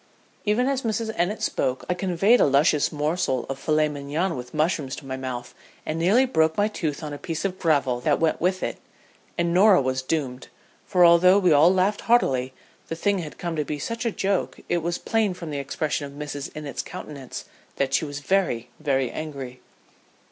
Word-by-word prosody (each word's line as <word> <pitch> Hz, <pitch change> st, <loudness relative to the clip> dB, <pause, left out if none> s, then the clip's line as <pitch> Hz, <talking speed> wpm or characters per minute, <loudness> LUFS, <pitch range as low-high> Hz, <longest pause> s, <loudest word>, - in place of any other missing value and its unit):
'" -, -, -35 dB
"Even 245 Hz, +4 st, +2 dB
as 270 Hz, -1 st, 0 dB
Mrs. 220 Hz, -1 st, -2 dB
Innitt 180 Hz, +5 st, -1 dB
spoke 130 Hz, 0 st, -1 dB
I 180 Hz, -, +1 dB
conveyed 190 Hz, +5 st, +3 dB
a -, -, +5 dB
luscious 145 Hz, +2 st, +3 dB
morsel 150 Hz, -3 st, -1 dB
of 135 Hz, 0 st, -5 dB
filet 155 Hz, +1 st, +2 dB
mignon 150 Hz, +5 st, -2 dB
with 125 Hz, -1 st, -7 dB
mushrooms 155 Hz, -4 st, 0 dB
to 140 Hz, -, -11 dB
my 130 Hz, -1 st, -4 dB
mouth 130 Hz, -2 st, -5 dB, 0.3 s
and 155 Hz, +1 st, -2 dB
nearly 205 Hz, +10 st, +4 dB
broke 160 Hz, -10 st, +1 dB
my 205 Hz, 0 st, +3 dB
tooth 160 Hz, -8 st, -3 dB
on 150 Hz, -1 st, -5 dB
a 145 Hz, -, -7 dB
piece 165 Hz, +1 st, -4 dB
of 185 Hz, -1 st, -2 dB
gravel 140 Hz, -7 st, +2 dB
that -, -, +1 dB
went 165 Hz, -1 st, +1 dB
with 185 Hz, +2 st, +1 dB
it, -, -, -3 dB, 0.6 s
and 170 Hz, 0 st, +1 dB
Norah 195 Hz, +1 st, +6 dB
was 130 Hz, -1 st, -1 dB
doomed, 130 Hz, -3 st, -3 dB, 0.4 s
for 180 Hz, -3 st, +5 dB
although 175 Hz, +3 st, +6 dB
we 180 Hz, -5 st, +4 dB
all 155 Hz, +4 st, +6 dB
laughed 190 Hz, +2 st, +1 dB
heartily, 130 Hz, -, +2 dB, 0.4 s
the 165 Hz, -, -4 dB
thing 200 Hz, +3 st, +1 dB
had 155 Hz, -4 st, -7 dB
come 170 Hz, -2 st, -3 dB
to 150 Hz, -, 0 dB
be 150 Hz, +1 st, -4 dB
such 230 Hz, +10 st, -4 dB
a 235 Hz, -, +1 dB
joke, 195 Hz, -1 st, -1 dB
it 175 Hz, -, +1 dB
was 170 Hz, +1 st, -2 dB
plain 220 Hz, -5 st, 0 dB
from 170 Hz, -3 st, -7 dB
the 145 Hz, -, -3 dB
expression 145 Hz, +1 st, -2 dB
of 140 Hz, -, -12 dB
Mrs. 145 Hz, -1 st, -5 dB
Innitt's 150 Hz, -3 st, -5 dB
countenance 140 Hz, -4 st, -8 dB, 0.3 s
that 135 Hz, -1 st, -1 dB
she 135 Hz, -, +2 dB
was 145 Hz, -1 st, -5 dB
very, 165 Hz, -9 st, 0 dB
very 135 Hz, -4 st, 0 dB
angry. 135 Hz, -5 st, -6 dB
160 Hz, 200 wpm, -24 LUFS, 140-185 Hz, 0.6 s, Norah